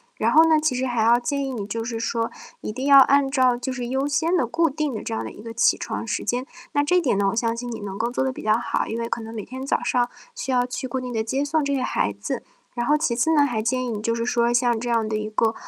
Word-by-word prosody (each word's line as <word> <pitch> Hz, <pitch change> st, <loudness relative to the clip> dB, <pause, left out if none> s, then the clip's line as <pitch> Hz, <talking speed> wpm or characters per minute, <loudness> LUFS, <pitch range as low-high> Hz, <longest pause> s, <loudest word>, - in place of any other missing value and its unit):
然 -, -, +1 dB
后 320 Hz, -, +7 dB
呢， 310 Hz, -1 st, +5 dB
其 305 Hz, -4 st, 0 dB
实 255 Hz, +1 st, -1 dB
还 235 Hz, -3 st, 0 dB
要 235 Hz, +2 st, +5 dB
建 280 Hz, +3 st, -2 dB
议 265 Hz, -, -4 dB
你 205 Hz, -4 st, -4 dB
就 225 Hz, +1 st, -3 dB
是 230 Hz, -1 st, -3 dB
说， 230 Hz, 0 st, -1 dB, 0.3 s
一 -, -, -4 dB
定 260 Hz, +3 st, -3 dB
要 280 Hz, -1 st, +8 dB
按 275 Hz, 0 st, +5 dB
照 255 Hz, -3 st, +3 dB
就 250 Hz, +2 st, -4 dB
是 250 Hz, -1 st, -4 dB
优 265 Hz, +3 st, -1 dB
先 325 Hz, +5 st, +1 dB
的、 250 Hz, -9 st, +1 dB
固 330 Hz, +5 st, +2 dB
定 300 Hz, -2 st, -2 dB
的 -, -, -5 dB
这 -, -, -4 dB
样 110 Hz, 0 st, -2 dB
的 110 Hz, -, -5 dB
一 -, -, -12 dB
个 230 Hz, 0 st, -7 dB
起 235 Hz, -, +3 dB
床 230 Hz, 0 st, -4 dB
时 220 Hz, -, -3 dB
间。 250 Hz, +2 st, -1 dB, 0.3 s
那 290 Hz, 0 st, +3 dB
这 360 Hz, +5 st, +3 dB
点 265 Hz, -, +1 dB
呢， 200 Hz, -, +2 dB
我 225 Hz, -, -3 dB
相 230 Hz, 0 st, 0 dB
信 240 Hz, 0 st, -5 dB
你 225 Hz, -, -5 dB
能 195 Hz, -1 st, -5 dB
够 235 Hz, -, 0 dB
做 250 Hz, -, -1 dB
得 265 Hz, -1 st, -1 dB
比 -, -, -8 dB
较 215 Hz, +1 st, +3 dB
好。 235 Hz, -, -1 dB
因 230 Hz, -, -3 dB
为 230 Hz, -, -2 dB
可 230 Hz, -, -3 dB
能 225 Hz, +1 st, -8 dB
每 215 Hz, -3 st, -6 dB
天 260 Hz, +1 st, -7 dB
早 275 Hz, -, 0 dB
上 245 Hz, -1 st, +1 dB, 0.3 s
需 385 Hz, -, -4 dB
要 245 Hz, -1 st, +2 dB
去 255 Hz, +1 st, -5 dB
固 260 Hz, +1 st, -3 dB
定 250 Hz, -1 st, -5 dB
地 220 Hz, -1 st, 0 dB
接 270 Hz, +5 st, -1 dB
送 305 Hz, +1 st, +1 dB
这 280 Hz, 0 st, 0 dB
些 255 Hz, -, -1 dB
孩 -, -, 0 dB
子。 -, -, -4 dB, 0.3 s
然 240 Hz, -1 st, -1 dB
后 300 Hz, -, +4 dB
其 300 Hz, -5 st, 0 dB
次 255 Hz, +7 st, +2 dB
呢， 290 Hz, -2 st, +5 dB
还 225 Hz, -5 st, -1 dB
建 255 Hz, +3 st, 0 dB
议 245 Hz, -, -3 dB
你 210 Hz, -2 st, -3 dB
就 230 Hz, +1 st, 0 dB
是 230 Hz, -, -2 dB
说， 240 Hz, 0 st, +2 dB
像 240 Hz, -2 st, +2 dB
这 240 Hz, +1 st, -4 dB
样 225 Hz, -2 st, +1 dB
的 215 Hz, -, -1 dB
一 215 Hz, 0 st, -4 dB
个 225 Hz, +1 st, +2 dB
245 Hz, 335 characters per minute, -23 LUFS, 230-270 Hz, 0.3 s, 要